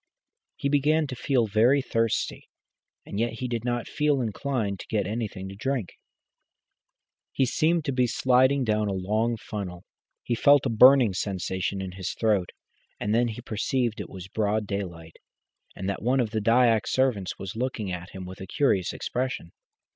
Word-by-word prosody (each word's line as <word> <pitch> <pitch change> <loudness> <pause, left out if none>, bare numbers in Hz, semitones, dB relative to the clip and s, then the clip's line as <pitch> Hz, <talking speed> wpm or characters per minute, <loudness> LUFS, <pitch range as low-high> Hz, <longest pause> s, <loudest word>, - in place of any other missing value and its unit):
He - - -2
began 150 +2 +2
to 130 -3 -6
feel 125 -1 +1
very 110 +7 +4
thirsty, 115 -4 -1 0.6
and 100 - -5
yet 115 0 0
he 125 +2 -4
did 120 -2 -3
not 120 -1 -2
feel 150 -2 +1
inclined 110 -3 -2
to - - -9
get 105 -3 0
anything 105 -2 -4
to 95 - -9
drink. 125 -3 -2 1.4
He 135 - +2
seemed 160 +5 +1
to 140 - 0
be 125 -1 +2
sliding 130 +3 +3
down 105 -2 +1
a 100 - -1
long 110 +5 0
funnel. 95 -5 -6 0.4
He 120 - -1
felt 140 +4 +5
a - - +1
burning 125 -1 +7
sensation 95 0 -2
in 95 - -5
his 95 0 -5
throat, 105 -5 +1 0.5
and 105 +1 -1
then 120 +1 +3
he 115 +1 -6
perceived 120 +1 -1
it - - -8
was 95 -1 -9
broad 105 +1 0
daylight, 85 -5 -5 0.6
and 95 - -5
that 100 - -2
one 125 +4 +2
of 115 -4 0
the 110 -2 -1
Dyak 115 0 +3
servants 125 -8 0
was 95 +1 -6
looking 115 -5 -2
at 90 0 -6
him 95 -1 -8
with 95 +1 -9
a 95 - -7
curious 95 -7 +1
expression. 125 -9 -3
110 Hz, 175 wpm, -26 LUFS, 100-130 Hz, 1.4 s, burning